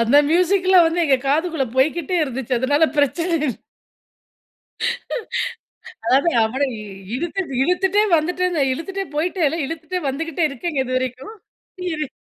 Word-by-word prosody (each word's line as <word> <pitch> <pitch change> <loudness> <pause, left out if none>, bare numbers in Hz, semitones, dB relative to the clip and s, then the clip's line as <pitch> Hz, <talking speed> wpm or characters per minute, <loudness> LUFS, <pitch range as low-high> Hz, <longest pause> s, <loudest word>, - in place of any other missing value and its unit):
அந்த 230 +4 +4
மியூசிக்லாம் 365 +1 +4
வந்து 335 +1 +1
எங்க 270 -3 +4
காதுக்குள்ள 315 -1 +1
போய்க்கிட்டே 315 +6 +1
இருந்துச்சு. 265 -2 -5
அதனால 290 +4 +3
பிரச்சன 335 +5 +1
இல்ல. 250 - -2 2.5
அதாது 270 +8 +3
அவன 265 +6 0 0.5
இழுத்திட்டு 335 0 -3
இழுத்துட்டே 380 +6 +2
வந்துடென்ல 355 0 0
இழுத்துட்டே 390 +8 -4
போயிட்டேன்ல 325 0 0
இழுத்துட்டே 330 +4 -4
வந்துகிட்டே 325 +4 -2
இருக்கேங்க 280 +3 -4
இதுவரைக்கும். 255 - -3 0.6
இரு. 305 -1 -2
320 Hz, 110 wpm, -21 LUFS, 270-355 Hz, 2.5 s, அந்த